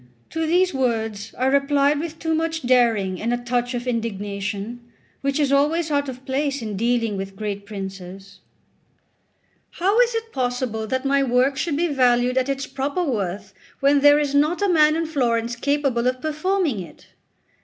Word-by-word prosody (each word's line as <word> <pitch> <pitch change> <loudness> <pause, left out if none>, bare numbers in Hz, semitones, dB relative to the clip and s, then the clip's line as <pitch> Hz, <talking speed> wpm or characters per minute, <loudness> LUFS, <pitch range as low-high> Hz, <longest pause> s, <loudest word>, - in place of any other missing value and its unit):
To 325 0 -1
these 360 +2 +2
words 225 -5 -2
I 255 - 0
replied 280 +1 +2
with 325 0 -5
too 320 0 -1
much 325 0 -1
daring 230 -7 +2
and 230 +2 -1
a 240 - +1
touch 245 +1 -2
of 240 0 -4
indignation, 210 -1 -3 0.4
which 275 +1 -1
is 285 -2 +2
always 305 +4 +2
out 285 -1 0
of 255 0 -9
place 280 +1 -1
in 215 -2 -4
dealing 230 -1 0
with 195 0 -6
great 200 -1 -5
princes: 195 -1 -8 1.3
"How 390 +6 +1
is 485 -1 +3
it 455 0 -4
possible 245 -3 -2
that 260 +3 -2
my 275 0 +3
work 260 +1 +2
should 295 +1 -1
be 340 - +1
valued 250 -3 +2
at 260 +1 -2
its 275 0 -2
proper 280 +6 -2
worth 205 - -3 0.3
when 280 +1 +4
there 290 +1 +6
is 290 -2 0
not 305 +7 +2
a - - +3
man 305 -3 +4
in 330 0 -1
Florence 240 -6 0
capable 275 -2 0
of 255 0 0
performing 310 - -1
it?" 170 -4 -11
260 Hz, 175 wpm, -22 LUFS, 225-295 Hz, 1.3 s, there